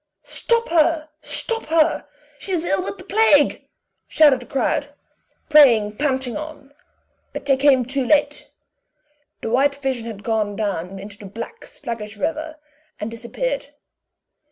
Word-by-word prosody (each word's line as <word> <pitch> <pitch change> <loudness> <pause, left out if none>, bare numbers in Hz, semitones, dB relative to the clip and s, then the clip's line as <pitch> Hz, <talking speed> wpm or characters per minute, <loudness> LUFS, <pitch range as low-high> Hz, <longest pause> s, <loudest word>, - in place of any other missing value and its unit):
"Stop 465 0 0
her! 320 -1 +2
stop 460 -1 -3
her! 320 0 +2 0.3
she 385 - -5
is 340 -1 0
ill 345 +4 0
of - - -5
the 370 - -11
plague!" 380 -8 +3 0.4
shouted 290 -5 +5
the 245 - -12
crowd, 285 +1 -1 0.5
preying 235 -9 +6
panting 265 -2 -1
on; 305 -2 -8 0.6
but - - -6
they 275 -1 +4
came 265 -2 +4
too 270 +2 -1
late; 290 +1 +2 0.9
the 225 - -3
white 275 +3 +3
vision 265 -4 -3
had 215 -3 -7
gone 215 -3 -1
down 195 -3 -3
into 200 +1 -10
the 205 - -10
black, 230 - -8
sluggish 215 -3 -7
river, 315 +6 -3 0.4
and 210 +2 -4
disappeared. - - -4
280 Hz, 140 wpm, -21 LUFS, 230-310 Hz, 0.9 s, preying